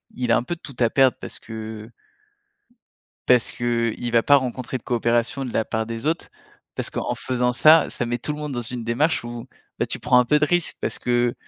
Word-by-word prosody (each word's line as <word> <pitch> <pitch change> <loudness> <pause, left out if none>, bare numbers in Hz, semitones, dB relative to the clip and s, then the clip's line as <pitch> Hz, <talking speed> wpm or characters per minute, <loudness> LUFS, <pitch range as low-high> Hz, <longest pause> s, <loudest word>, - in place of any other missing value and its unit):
il 125 -1 -1
a - - +5
un 120 - -1
peu 175 +7 -4
tout 140 -5 -12
à 120 -2 +3
perdre 130 -1 +3
parce - - -7
que 110 0 -8 1.4
parce 125 -2 +4
qu'l 115 -1 -1 0.2
va 115 -1 +3
pas 145 0 +6
rencontrer 130 0 -3
de 115 - -18
coopération 120 +2 0
de 125 - -5
la 110 - +1
part 110 0 -2
des 115 +3 -6
autres, 165 +2 -1 0.5
parce - - -3
qu'en - - -3
faisant 125 -1 0
ça, 155 +5 +6
ça 120 - -2
met 120 +1 -2
tout 150 - -3
le 150 - -7
monde 150 -2 -4
dans 120 - -2
une 120 +1 -5
démarche 125 +6 +1
où, 120 0 -7 0.3
bah, - - +1
tu - - -5
prends 125 - +3
un 125 - +3
peu 150 +4 +3
de 150 - +3
risque, 175 +1 +1
parce - - -2
que 120 0 +1
120 Hz, 225 wpm, -23 LUFS, 115-135 Hz, 1.4 s, pas